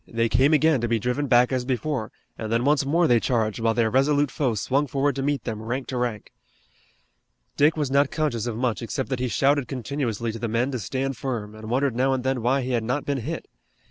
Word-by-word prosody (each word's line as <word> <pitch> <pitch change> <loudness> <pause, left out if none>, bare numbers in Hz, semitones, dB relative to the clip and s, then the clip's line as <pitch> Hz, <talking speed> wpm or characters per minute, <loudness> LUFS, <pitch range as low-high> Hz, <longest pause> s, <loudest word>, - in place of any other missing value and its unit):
They 115 -1 0
came 130 +6 +3
again 155 -3 +3
to 120 - 0
be 115 0 +1
driven 125 +6 -1
back 125 0 +4
as 130 -1 0
before, 130 -2 -2 0.2
and 110 -1 -5
then 115 +2 +1
once 145 -1 +2
more 170 +4 +3
they 120 -6 +4
charged, 110 -2 0
while 115 0 +1
their 115 -2 +2
resolute 145 +2 +2
foe 130 -6 0
swung 135 +7 0
forward 140 +1 0
to 135 - -2
meet 140 -2 -1
them 110 -3 -4
rank 125 +4 -3
to 130 - -3
rank. 120 -4 -3 1.2
Dick 150 +3 +3
was 145 -4 -1
not 140 0 +3
conscious 125 -8 -1
of 115 -2 -3
much 120 -2 -1
except 125 +3 -3
that 130 -2 -2
he 125 - 0
shouted 140 +2 +2
continuously 120 -3 -3
to 115 - -7
the 115 - -2
men 120 +4 0
to 125 - -3
stand 130 +5 -3
firm, 115 -6 -4
and 110 0 -9
wondered 130 0 +1
now 130 +2 +2
and 130 -1 -2
then 130 -2 0
why 130 +4 +2
he 130 - -3
had 120 -2 0
not 125 +5 -2
been 140 -1 -1
hit. 155 +8 -5
125 Hz, 235 wpm, -24 LUFS, 115-140 Hz, 1.2 s, back